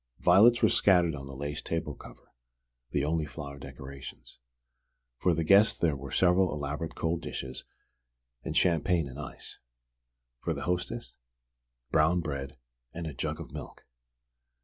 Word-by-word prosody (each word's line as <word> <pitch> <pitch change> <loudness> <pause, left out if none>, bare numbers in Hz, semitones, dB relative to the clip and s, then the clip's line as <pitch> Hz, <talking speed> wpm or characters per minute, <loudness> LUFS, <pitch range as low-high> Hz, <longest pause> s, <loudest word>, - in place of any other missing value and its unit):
Violets 120 +4 +6
were - - +8
scattered 90 -4 +4
on 70 -2 -7
the 70 - -8
lace 70 +2 -4
table 80 -3 -3
cover, - - -14 0.6
the 70 - 0
only 80 0 0
flower 70 0 -8
decorations. 70 -1 -10 0.8
For 90 -2 +3
the 80 - 0
guest 100 +6 +5
there 80 -4 +2
were 70 0 -7
several 90 +3 +4
elaborate 75 +2 -4
cold 85 +1 -1
dishes 65 -4 -5 0.8
and - - -2
champagne 85 -2 +3
in 70 +2 -9
ice; 75 - -8 0.8
for - - -2
the - - -5
hostess, 90 +7 -2 0.8
brown 80 +3 +4
bread 70 -4 -4 0.3
and 85 +4 -6
a 80 - -4
jug - - -3
of - - -8
milk! - - -9
80 Hz, 145 wpm, -30 LUFS, 70-90 Hz, 0.8 s, were